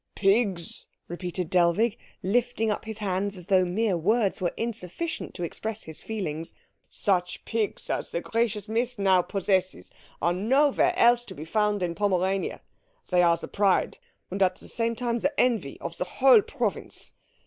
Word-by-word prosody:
"Pigs?" 195 -4 +1 0.2
repeated 175 0 -4
Dellwig, 185 +6 +3 0.3
lifting 225 +2 +1
up 210 - -3
his 220 -1 -5
hands 200 -1 -2
as 180 - -9
though 190 -1 +4
mere 195 +3 0
words 200 +5 +1
were 175 - +1
insufficient 230 - -4
to 175 - -4
express 220 +6 -3
his 160 -1 -5
feelings, 165 -7 -4 0.3
"such 180 -3 -1
pigs 225 -3 -2
as - - -2
the - - -2
gracious 220 0 -1
Miss 235 +3 -1
now 190 -2 +4
possesses 185 - -1 0.3
are 170 +3 +1
nowhere 275 - +2
else 240 0 +5
to - - -10
be 155 - -7
found 210 +2 +1
in 170 -1 -1
Pomerania. 190 0 0 0.5
They 180 -1 +5
are 170 -1 +4
the - - -7
pride, 200 -2 +1 0.3
and 195 +2 -3
at 185 -1 +3
the - - -11
same 230 0 -1
time 235 0 -1
the 285 +4 -1
envy, 225 - +1
of 165 - -6
the - - 0
whole 250 +4 +5
province. 220 - -4
200 Hz, 165 wpm, -26 LUFS, 180-230 Hz, 0.5 s, else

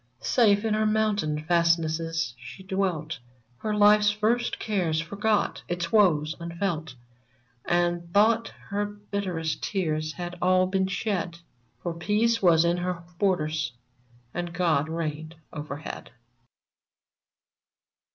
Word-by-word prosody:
Safe 210 -3 +3
in 220 - +1
her 215 0 +2
mountain 205 -8 +1
fastnesses 165 -3 +1
she 125 +10 -10
dwelt. 185 -6 -2 0.4
Her 215 - -3
life's 210 0 +6
first 215 +3 0
cares 180 -7 0
forgot, 200 +5 0
its 175 -1 -3
woes 165 -8 +4
unfelt, 170 -4 -3 0.7
And 175 0 0
thought 220 +4 +4 0.2
her 205 0 0
bitterest 200 -6 -3
tears 155 -5 -1
had 175 0 -6
all 185 0 +4
been 190 0 0
shed, 185 -3 -2 0.5
For 175 - -2
peace 210 +7 +1
was 170 -3 +5
in 170 +1 +2
her 175 -1 -3 0.2
borders, 155 -8 0 0.6
and 175 0 -3
God 160 -4 +1
reigned 160 -1 -4 0.2
overhead. 150 0 -6
175 Hz, 110 wpm, -26 LUFS, 160-205 Hz, 0.7 s, life's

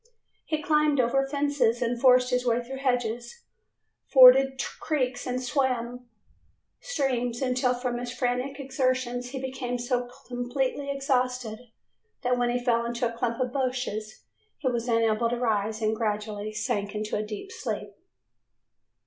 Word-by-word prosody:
He 310 -1 -1
climbed 300 -4 +3
over 270 +3 +2
fences 280 -5 +1
and 240 -1 -1
forced 250 -1 +5
his 250 0 +1
way 240 0 +1
through 265 +2 -7
hedges; 245 - -2 0.7
forded 265 0 +8 0.2
creeks 260 -5 -1
and 250 0 -1
swam 250 -2 -1 0.7
streams, 255 - -1
until 250 -1 +1
from 245 -1 -2
his 245 0 -5
frantic 250 +2 -2
exertions 255 -2 -1
he 265 +1 -5
became 260 -1 -3
so 245 0 -1 0.2
completely 255 +3 -2
exhausted 255 -5 -1 0.6
that 250 0 +2
when 245 -1 +1
he 245 - +1
fell 240 -1 +1
into 235 +1 -1
a 230 - -7
clump 235 0 -2
of 250 -1 -1
bushes 250 -5 -3 0.3
he 285 - -3
was 240 -1 -1
unable 230 0 +2
to 240 - -1
rise, 220 -2 0
and 215 +1 +2
gradually 210 -1 -2
sank 210 -1 -2
into 210 0 -2
a - - 0
deep 215 - -7
sleep. - - -4
245 Hz, 145 wpm, -27 LUFS, 235-260 Hz, 0.7 s, forded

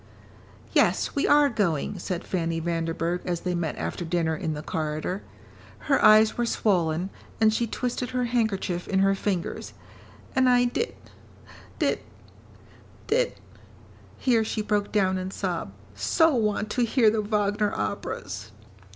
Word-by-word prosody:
"Yes, - - +2
we 280 - +1
are 290 0 +6
going," 195 - -1
said 180 -1 -3
Fanny 165 -2 -1
Vanderburgh 165 +1 -1
as 175 -2 -2
they 180 - -1
met 170 -3 -2
after - - -3
dinner 165 -1 0
in 155 0 -3
the 150 - -6
corridor. 155 +6 -3 0.6
Her 275 - +1
eyes 215 +1 +6
were 240 - +2
swollen, 180 -4 +1 0.3
and 220 -1 +4
she 235 +1 0
twisted 250 +2 -3
her 250 0 -1
handkerchief 220 -7 -1
in 195 - 0
her 195 0 +4
fingers. 195 -3 -3 0.6
"And 260 -1 +4
I 245 0 +5
did 355 - -2 0.8
did - - +1 1.1
did - - +1 0.4
" - - -24
here 235 -4 +2
she 215 0 -2
broke 205 -1 0
down 190 -3 +2
and 185 +1 -4
sobbed 175 - -3 0.2
"so 100 - +3
want 215 -3 0
to 245 - +1
hear 230 -1 +4
the 220 0 0
Wagner 205 0 0
operas." 105 +1 -4
200 Hz, 145 wpm, -26 LUFS, 170-225 Hz, 1.1 s, are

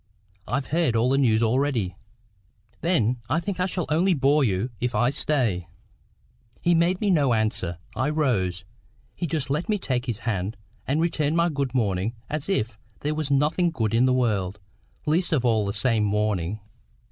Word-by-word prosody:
"I've 130 +4 -1
heard 160 -8 +2
all 120 +3 +2
the 135 - +3
news 115 -4 +3
already." 115 - +1 0.8
"Then 125 - +1
I 165 - +2
think 185 +1 -4
I 180 - +2
shall 180 -2 -2
only 175 +4 +3
bore 145 +1 +3
you 110 +2 0
if 125 +1 -1
I 120 +1 +3
stay." 120 - 0 0.9
He 175 - +2
made 170 +2 +2
me 205 -2 +1
no 140 -8 +3
answer. 105 -6 -1 0.2
I 130 - 0
rose. 100 - 0 0.5
He 170 - -3
just 145 -3 -2
let 155 +9 -1
me 210 - +2
take 130 -8 -2
his 115 -2 -3
hand, 100 -2 -2 0.3
and 145 +4 +1
returned 160 -2 +1
my 170 +1 +3
good 140 -4 -2
morning 105 -1 0 0.2
as 150 +3 -3
if 115 - -1 0.2
there 150 +1 -1
was 155 -2 -2
nothing 150 +5 +2
good 115 -9 -1
in 120 +3 +4
the - - +3
world, 105 -6 0 0.5
least 165 +4 +1
of 135 -6 +1
all 110 -4 +2
this 100 - -2
same 115 -2 +2
morning. 105 -2 0
130 Hz, 180 wpm, -25 LUFS, 110-155 Hz, 0.9 s, in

